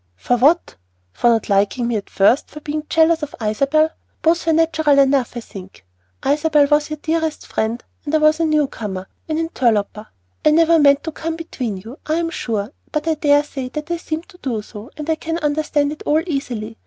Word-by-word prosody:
"For 170 Hz, -, 0 dB
what, 295 Hz, +8 st, +2 dB, 0.4 s
for 240 Hz, -, +2 dB
not 225 Hz, -2 st, +2 dB
liking 205 Hz, +5 st, +1 dB
me 235 Hz, -, -1 dB
at 205 Hz, -, -4 dB
first; 205 Hz, +7 st, +3 dB
for 300 Hz, -, -10 dB
being 300 Hz, 0 st, -4 dB
jealous 325 Hz, 0 st, +3 dB
of 295 Hz, -1 st, -5 dB
Isabel? 275 Hz, +9 st, +2 dB, 0.3 s
Both 330 Hz, +1 st, +2 dB
were 325 Hz, -, +4 dB
natural 315 Hz, -3 st, +3 dB
enough, 270 Hz, -3 st, +3 dB
I -, -, -4 dB
think. 190 Hz, -, -12 dB, 0.4 s
Isabel 295 Hz, +1 st, +3 dB
was 295 Hz, 0 st, +3 dB
your 305 Hz, -, -4 dB
dearest 320 Hz, 0 st, -2 dB
friend; 225 Hz, +2 st, -2 dB, 0.2 s
and 300 Hz, +1 st, -1 dB
I -, -, +6 dB
was 305 Hz, +1 st, +3 dB
a 330 Hz, -, +2 dB
new 305 Hz, -2 st, +3 dB
comer, 190 Hz, -7 st, -6 dB, 0.2 s
an 310 Hz, -, 0 dB
interloper. 225 Hz, -9 st, 0 dB, 0.4 s
I -, -, +5 dB
never 330 Hz, +1 st, +5 dB
meant 280 Hz, -1 st, +5 dB
to 320 Hz, -, -4 dB
come 320 Hz, +1 st, -4 dB
between 255 Hz, -, -4 dB
you, 225 Hz, +9 st, -11 dB
I 310 Hz, -, +1 dB
am 330 Hz, 0 st, -1 dB
sure; 220 Hz, -6 st, -3 dB, 0.2 s
but 305 Hz, 0 st, -2 dB
I 325 Hz, -, +3 dB
daresay 290 Hz, -3 st, +1 dB
that 300 Hz, +2 st, -5 dB
I 340 Hz, -, 0 dB
seemed 320 Hz, 0 st, -5 dB
to 360 Hz, -, -17 dB
do 230 Hz, -, -3 dB
so, 210 Hz, +3 st, -11 dB
and 300 Hz, -1 st, -6 dB
I 320 Hz, -, +2 dB
can 325 Hz, +1 st, -3 dB
understand 295 Hz, -2 st, 0 dB
it 300 Hz, -, -8 dB
all 310 Hz, +2 st, +2 dB
easily. 240 Hz, -8 st, -4 dB
295 Hz, 205 wpm, -20 LUFS, 235-315 Hz, 0.4 s, I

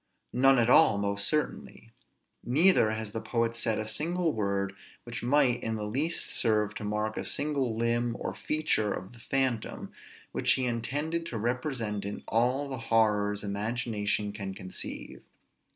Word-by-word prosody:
none 135 Hz, +2 st, +5 dB
at 115 Hz, -1 st, +3 dB
all, 110 Hz, -4 st, +6 dB
most 100 Hz, 0 st, 0 dB
certainly: 150 Hz, -6 st, -2 dB, 0.5 s
neither 150 Hz, -, +4 dB
has 110 Hz, -1 st, -3 dB
the 115 Hz, -, -4 dB
poet 115 Hz, -1 st, -1 dB
said 115 Hz, -2 st, 0 dB
a 110 Hz, -, -2 dB
single 160 Hz, +9 st, +1 dB
word 100 Hz, -2 st, -1 dB, 0.3 s
which 120 Hz, 0 st, -6 dB
might 125 Hz, -1 st, +3 dB
in 110 Hz, 0 st, -2 dB
the 105 Hz, -, -4 dB
least 145 Hz, +10 st, -2 dB
serve 105 Hz, -3 st, +1 dB
to -, -, -7 dB
mark 105 Hz, +1 st, -2 dB
a -, -, -2 dB
single 140 Hz, -6 st, 0 dB
limb 115 Hz, 0 st, 0 dB
or -, -, -3 dB
feature 155 Hz, -9 st, 0 dB
of 95 Hz, +5 st, -5 dB
the 120 Hz, -, -15 dB
phantom, 130 Hz, -2 st, -1 dB, 0.4 s
which -, -, +3 dB
he 130 Hz, -, 0 dB
intended 145 Hz, +8 st, -2 dB
to 145 Hz, -9 st, -5 dB
represent 120 Hz, -3 st, -2 dB
in 100 Hz, +1 st, -5 dB
all 125 Hz, +5 st, +1 dB
the 130 Hz, -2 st, -5 dB
horrors 105 Hz, -2 st, +2 dB
imagination 105 Hz, 0 st, -1 dB
can 100 Hz, -2 st, -5 dB
conceive. 95 Hz, -1 st, -6 dB
115 Hz, 155 wpm, -29 LUFS, 105-130 Hz, 0.5 s, all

